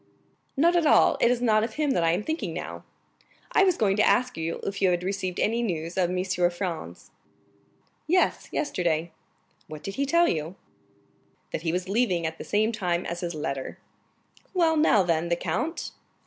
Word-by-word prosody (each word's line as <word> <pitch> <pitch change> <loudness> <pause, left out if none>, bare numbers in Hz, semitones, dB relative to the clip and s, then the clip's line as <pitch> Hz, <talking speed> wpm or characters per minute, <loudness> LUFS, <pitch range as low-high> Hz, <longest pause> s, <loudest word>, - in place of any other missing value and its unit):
"Not 340 +5 +4
at 335 -3 +3
all. - - +5
It - - +5
is 245 0 0
not 215 -2 +3
of 225 -1 -4
him 300 -2 +1
that 175 - +1
I 165 - +3
am 180 - 0
now - - -12
thinking. 315 +1 -3 0.9
I - - +4
was 370 -3 +3
going 195 -3 +2
to - - +4
ask 250 0 +2
you 165 +1 -3
if 195 0 -4
you 190 - +4
had 175 0 0
received 185 -1 -3
any 230 +3 +1
news 170 -6 -3
of 180 -2 +1
Monsieur 180 -1 +1
Franz." 175 - -6 1.0
"Yes,—yesterday." 175 - 0 0.6
"What 155 -1 -9
did 195 - -6
he 280 0 0
tell 340 +4 +4
you?" 160 +3 -2 1.0
"That - - -3
he 165 -1 -1
was 180 +1 -2
leaving 195 -5 +1
at 160 0 -4
the - - -5
same 215 +2 +1
time 180 -5 -1
as 170 0 -4
his 170 -2 -4
letter." 135 -3 -4 0.8
"Well, 330 -3 +3
now 300 -10 +4
then, 170 -1 0
the 170 - +2
count?" 325 - -3
190 Hz, 185 wpm, -26 LUFS, 170-245 Hz, 1.0 s, all